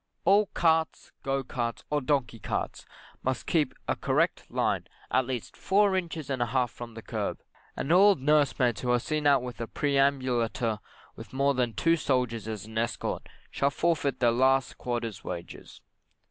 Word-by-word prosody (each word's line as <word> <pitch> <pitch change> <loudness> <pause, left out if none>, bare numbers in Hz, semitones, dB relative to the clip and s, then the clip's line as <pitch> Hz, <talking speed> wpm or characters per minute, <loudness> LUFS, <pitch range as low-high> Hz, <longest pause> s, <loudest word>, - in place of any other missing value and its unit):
All 200 +1 +5
carts, 160 -1 +1
go 135 0 -1
carts, 120 -2 -3
or 150 0 +1
donkey 130 -4 0
carts, - - -4 0.3
must 130 -3 -2
keep 150 -6 +1
a - - +1
correct - - 0
line, - - 0 0.2
at 130 - +2
least 125 -4 -4
four 200 0 +3
inches 165 -5 -3
and 130 -2 -1
a 120 - +2
half 125 -1 0
from 120 -2 -9
the 115 - -8
kerb, - - -3 0.4
and 145 - -2
all 195 +3 +7
nursemaids 135 -5 +2
who 125 - -2
are 125 - +4
seen 150 +3 -1
out 140 -3 +4
with 125 -3 -6
a 115 - -3
perambulator 130 -6 +1 0.4
with - - -11
more 140 +1 +2
than 125 -3 0
two 165 +8 +3
soldiers 125 -7 0
as 110 -3 -5
an 110 0 -4
escort, 115 0 -3 0.2
shall 140 - +1
forfeit 150 -2 0
their 120 -2 +4
last 130 +2 +2
quarter's 120 -4 -3
wages. 85 -1 -8
130 Hz, 170 wpm, -28 LUFS, 120-150 Hz, 0.4 s, all